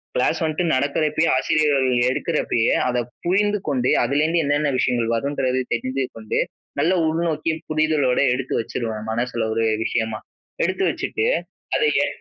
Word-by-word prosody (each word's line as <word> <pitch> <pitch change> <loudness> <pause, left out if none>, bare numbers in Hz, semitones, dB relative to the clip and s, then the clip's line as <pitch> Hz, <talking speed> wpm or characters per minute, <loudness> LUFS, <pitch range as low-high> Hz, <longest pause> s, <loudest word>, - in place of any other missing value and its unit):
Class 125 - +1
வந்துட்டு 160 +1 0
நடக்கிறப்பயே, 150 +4 +1
ஆசிரியர்கள் 140 -1 +2 0.2
எடுக்கிறப்பயே, 130 -7 0
அதை 125 0 0 0.2
புரிந்து 205 +3 +2
கொண்டே 130 -2 +1
அதிலேருந்து 155 +6 +1
என்னென்ன 145 +1 +1
விஷயங்கள் 120 -2 +1
வருன்றதயும் 130 -2 -1
தெரிந்து 130 +3 -1
கொண்டு, 110 -1 -2 0.4
நல்ல 170 +6 +3
உள்நோக்கி 160 0 0 0.2
புரிதலோடு 155 -4 +2
எடுத்து 130 +1 -3
வச்சுருவேன். 110 -1 -4
மனசுல 120 0 -1
ஒரு 115 - 0 0.2
விஷயமா. 110 -2 -1 0.4
எடுத்து 385 - 0
வச்சுட்டு 435 - -2 0.5
அத - - +1 0.2
எ - - +1
140 Hz, 130 wpm, -22 LUFS, 120-155 Hz, 0.5 s, நல்ல